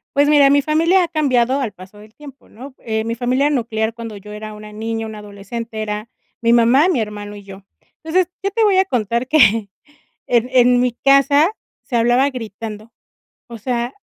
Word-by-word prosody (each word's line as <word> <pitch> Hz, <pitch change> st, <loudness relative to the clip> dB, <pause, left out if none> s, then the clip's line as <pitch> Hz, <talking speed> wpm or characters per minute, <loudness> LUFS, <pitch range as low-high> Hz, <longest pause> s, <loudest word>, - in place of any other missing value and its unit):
Pues 285 Hz, +1 st, +4 dB
mira, 290 Hz, -2 st, +5 dB
mi 285 Hz, 0 st, +4 dB
familia 330 Hz, +5 st, +2 dB
ha -, -, -8 dB
cambiado 270 Hz, -4 st, +1 dB
al 235 Hz, -6 st, -2 dB
paso 190 Hz, +2 st, -15 dB
del 215 Hz, +1 st, -16 dB
tiempo, 280 Hz, -3 st, -15 dB
¿no?, 260 Hz, +4 st, -12 dB
eh, 220 Hz, -1 st, -3 dB
mi 230 Hz, 0 st, -3 dB
familia 255 Hz, +4 st, +1 dB
nuclear 225 Hz, -4 st, -1 dB
cuando 230 Hz, -2 st, -8 dB
yo 210 Hz, +1 st, -11 dB
era 215 Hz, 0 st, -7 dB
una 210 Hz, 0 st, -11 dB
niña, 225 Hz, +1 st, -4 dB
una 220 Hz, -1 st, -8 dB
adolescente 215 Hz, +2 st, -7 dB
era 210 Hz, +1 st, -5 dB, 0.3 s
mi 230 Hz, 0 st, +2 dB
mamá, 240 Hz, +8 st, +4 dB
mi 325 Hz, -10 st, +1 dB
hermano 210 Hz, -1 st, -6 dB
y 205 Hz, -, -12 dB
yo. 195 Hz, 0 st, -12 dB, 0.4 s
Entonces, 345 Hz, +2 st, +1 dB
qué 395 Hz, -, -1 dB
yo -, -, -20 dB
te 450 Hz, +2 st, +1 dB
voy 395 Hz, -2 st, +3 dB
a 380 Hz, -, +5 dB
contar 235 Hz, -, -2 dB
que 225 Hz, -8 st, +4 dB, 0.6 s
en 240 Hz, 0 st, +2 dB
en 245 Hz, -1 st, +4 dB
mi 250 Hz, -1 st, +1 dB
casa 275 Hz, +5 st, +3 dB, 0.3 s
se 245 Hz, -, -4 dB
hablaba 245 Hz, +4 st, +3 dB
gritando, 220 Hz, -2 st, -8 dB, 0.6 s
o 235 Hz, -1 st, -9 dB
sea 240 Hz, +2 st, -3 dB
235 Hz, 195 wpm, -18 LUFS, 215-275 Hz, 0.6 s, mira